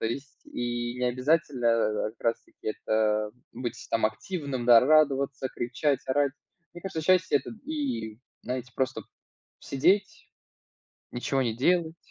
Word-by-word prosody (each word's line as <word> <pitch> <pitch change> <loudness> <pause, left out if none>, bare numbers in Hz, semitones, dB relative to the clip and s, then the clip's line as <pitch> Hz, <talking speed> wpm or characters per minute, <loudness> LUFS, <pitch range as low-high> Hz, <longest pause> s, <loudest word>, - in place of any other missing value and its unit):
то - - -3
есть 135 +4 -6
и 120 0 -3
необязательно, 125 +1 +1
э 110 -2 +2
э, - - -8
как 110 - -37
раз 115 0 0
таки - - -9
это 110 -1 0 0.2
быть 120 0 -5
там 115 -1 +1
активным, 130 - -4
да, 120 -2 +9
радоваться, 140 -2 +3
кричать, 130 +3 -1
орать. 140 +1 +2 0.4
Мне 175 - -10
кажется, 185 -4 -3
счастье- 185 -2 +4
это - - -9
и, 270 - -3 0.2
знаете, 125 0 -4
просто 130 -3 -1 0.6
сидеть, 185 +9 +1 0.8
ничего 135 +2 -1
не 115 -3 -1
делать- 165 +5 +2
130 Hz, 140 wpm, -28 LUFS, 120-155 Hz, 0.8 s, да